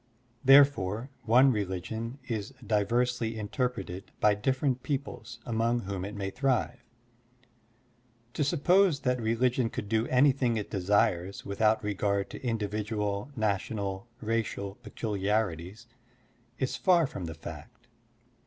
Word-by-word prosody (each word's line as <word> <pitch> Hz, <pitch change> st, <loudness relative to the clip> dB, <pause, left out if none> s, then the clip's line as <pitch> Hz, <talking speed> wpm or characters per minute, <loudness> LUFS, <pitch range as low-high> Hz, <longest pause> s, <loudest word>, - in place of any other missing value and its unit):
Therefore, 135 Hz, -4 st, +5 dB
one 125 Hz, +4 st, +6 dB
religion 110 Hz, +4 st, -3 dB
is 110 Hz, +2 st, -4 dB
diversely 115 Hz, +2 st, +1 dB
interpreted 110 Hz, -4 st, -3 dB
by 105 Hz, -, +5 dB
different 130 Hz, +4 st, 0 dB
peoples 130 Hz, -5 st, -4 dB
among 115 Hz, +1 st, +1 dB
whom 95 Hz, -2 st, -4 dB
it 100 Hz, +2 st, -6 dB
may 100 Hz, -1 st, -3 dB
thrive. 125 Hz, -1 st, 0 dB, 1.5 s
To 150 Hz, -, 0 dB
suppose 170 Hz, +2 st, +3 dB
that 125 Hz, -1 st, 0 dB
religion 120 Hz, +2 st, +1 dB
could 105 Hz, -, -5 dB
do 110 Hz, +2 st, +1 dB
anything 130 Hz, -3 st, +3 dB
it 105 Hz, -, -4 dB
desires 95 Hz, -1 st, +1 dB
without 110 Hz, +2 st, +2 dB
regard 100 Hz, -1 st, -1 dB
to -, -, -8 dB
indi 115 Hz, -4 st, -1 dB
vidual, 105 Hz, +1 st, -2 dB
national, 100 Hz, -1 st, -2 dB
racial 110 Hz, -3 st, -2 dB
peculiarities 105 Hz, -2 st, -2 dB, 0.7 s
is 130 Hz, -, -1 dB
far 175 Hz, -4 st, +4 dB
from 100 Hz, -9 st, -6 dB
the 80 Hz, -1 st, -6 dB
fact. 80 Hz, -, -10 dB
110 Hz, 115 wpm, -29 LUFS, 100-125 Hz, 1.5 s, one